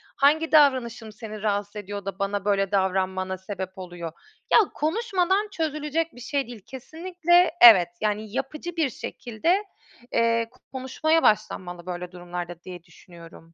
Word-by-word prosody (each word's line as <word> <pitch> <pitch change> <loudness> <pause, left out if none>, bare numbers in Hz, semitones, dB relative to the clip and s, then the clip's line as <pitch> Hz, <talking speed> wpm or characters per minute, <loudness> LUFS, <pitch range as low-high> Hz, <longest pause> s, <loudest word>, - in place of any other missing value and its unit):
hangi 310 +3 +3
davranışım 250 -7 +3
seni 215 -1 -9
rahatsız 205 0 -1
ediyor 205 -1 -6
da 195 0 -5
bana 200 0 -2
böyle 195 -1 +1
davranmana 190 -1 0
sebep 190 0 -7
oluyor? 175 -3 -7 0.4
Ya - - +9
konuşmadan 385 +3 0
çözülecek 315 -1 -2
bir 245 - -12
şey 275 +2 -2
değil 235 -3 -10
kesinlikle. 345 +6 +1
Evet, 195 -8 +9
yani 215 0 -1
yapıcı 305 +6 -4
bir 320 -5 +1
şekilde, 265 - -2 0.5
eee, 230 0 +2 0.2
konuşmaya 275 +5 0
başlanmalı 180 -5 0
böyle 180 -1 -5
durumlarda 175 -1 -7
diye 180 -2 -9
düşünüyorum. 165 -1 -16
215 Hz, 135 wpm, -25 LUFS, 190-300 Hz, 0.5 s, Ya